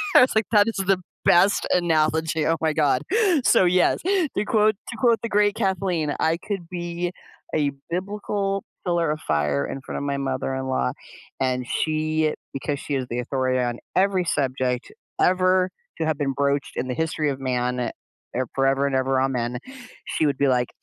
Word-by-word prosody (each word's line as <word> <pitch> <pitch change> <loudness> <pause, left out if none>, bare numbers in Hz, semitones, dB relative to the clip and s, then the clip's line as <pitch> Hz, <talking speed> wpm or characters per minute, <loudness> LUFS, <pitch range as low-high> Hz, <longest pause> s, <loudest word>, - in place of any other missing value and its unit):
I - - +10
was 250 - +3
like, 220 -2 +3
"That 210 -1 +5
is 225 - -2
the 195 -1 +2 0.2
best 190 +4 +4
analogy." 160 -2 +2
Oh 165 0 +2
my 160 -1 +1
God. 145 -4 +2 0.4
So 185 - +5
yes, 180 0 +3
to 350 - 0
quote 215 -1 +3
to 225 - -6
quote 235 0 +3
the 230 - -2
great 205 -1 +3
Kathleen, 180 -6 0
I 160 +1 +2
could 180 -2 -5
be 175 0 -3 0.4
a 145 -2 +2 0.2
"biblical 195 +2 -2 0.2
pillar 170 -2 +1
of 155 +1 -2
fire" 75 -2 0
in 135 - -6
front - - -6
of - - -3
my 140 -1 -1
mother-in-law, 130 - -1 0.5
and 125 -1 0
she- 155 0 0 0.2
because 140 +1 -3
she 145 - -5
is 130 -2 -1
the 120 - -2
authority 130 +1 0
on 120 -1 -1 0.2
every 190 -1 +3
subject 130 -4 -1 0.3
ever 185 0 +3 0.3
to 160 - 0
have 155 -2 0
been 140 -2 -1
broached 140 +1 0
in 130 - -2
the 125 - -2
history 160 -1 0
of 135 -1 -3
man, 125 -1 -1
eh, 125 - -1 0.7
forever 135 +1 +2
and 135 - -1
ever, 130 0 +2
amen- 125 -2 -1 0.5
she 155 - 0
would 140 -2 +1
be 140 - +3
like, 125 -2 +2
155 Hz, 180 wpm, -24 LUFS, 130-185 Hz, 0.7 s, I